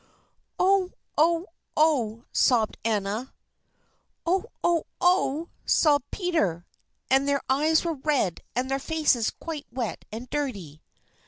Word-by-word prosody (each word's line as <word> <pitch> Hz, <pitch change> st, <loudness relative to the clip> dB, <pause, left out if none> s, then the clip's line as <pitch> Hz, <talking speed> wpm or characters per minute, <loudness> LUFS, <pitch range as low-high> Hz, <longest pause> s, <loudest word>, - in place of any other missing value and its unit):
"Oh! 375 Hz, 0 st, +3 dB, 0.2 s
oh! 335 Hz, +3 st, +3 dB, 0.3 s
oh!" 245 Hz, -8 st, +2 dB
sobbed 230 Hz, -4 st, +2 dB
Anna. 215 Hz, +3 st, -2 dB, 0.9 s
"Oh! 370 Hz, +5 st, +1 dB, 0.2 s
oh! 340 Hz, -2 st, +2 dB
oh!" 340 Hz, -3 st, +2 dB
sobbed 290 Hz, -4 st, +3 dB
Peter. 260 Hz, -, -1 dB, 0.5 s
And 270 Hz, +1 st, +4 dB
their 280 Hz, 0 st, +1 dB
eyes 310 Hz, +5 st, +3 dB
were 335 Hz, -, 0 dB
red 270 Hz, -, 0 dB
and 250 Hz, +2 st, 0 dB
their 270 Hz, -, +1 dB
faces 290 Hz, -6 st, +1 dB
quite 315 Hz, -3 st, -7 dB
wet 240 Hz, -3 st, -4 dB
and 230 Hz, +4 st, -6 dB
dirty. 200 Hz, -, -4 dB
280 Hz, 115 wpm, -26 LUFS, 230-325 Hz, 0.9 s, And